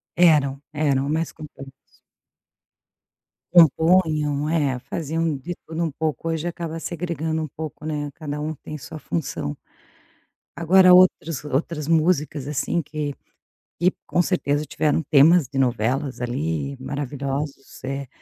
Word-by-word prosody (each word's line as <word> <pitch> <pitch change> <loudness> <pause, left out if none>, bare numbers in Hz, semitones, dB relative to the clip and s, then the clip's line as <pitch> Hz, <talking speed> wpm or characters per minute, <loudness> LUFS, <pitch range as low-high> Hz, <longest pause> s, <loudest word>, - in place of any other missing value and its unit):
Eram, 145 -5 +4
eram, 140 -2 +1
mais 160 +1 -1
completos. 140 -3 -13 1.5
Compunham, 155 -3 +4
é, 145 -6 +1
faziam 155 +3 -2
de 175 +6 -6
tudo 165 +1 -4
um 165 - 0
pouco, 155 +2 -3
hoje 165 +1 -2
acaba 165 -1 -4
segregando 160 -2 -3
um 155 - -3
pouco, 155 +1 -8
né, 145 -2 -3
cada 150 -1 -5
um 155 +1 -2
tem 155 +1 -8
sua 155 +2 -9
função. 100 - -3 1.0
Agora 185 +2 +6
outras 180 -5 +4
outras 150 +2 -2
músicas, 155 -4 +1
assim, 150 +4 -1
que 150 -1 -4 0.7
que 180 - +4 0.2
com 175 - +1
certeza 150 -5 0
tiveram 155 +2 0
temas 155 0 +6
de 140 - -4
novelas 130 +2 0
ali 140 +3 -2
maravilhosos, 140 +1 -5
eh, 135 +1 -3
150 Hz, 125 wpm, -23 LUFS, 140-165 Hz, 1.5 s, Agora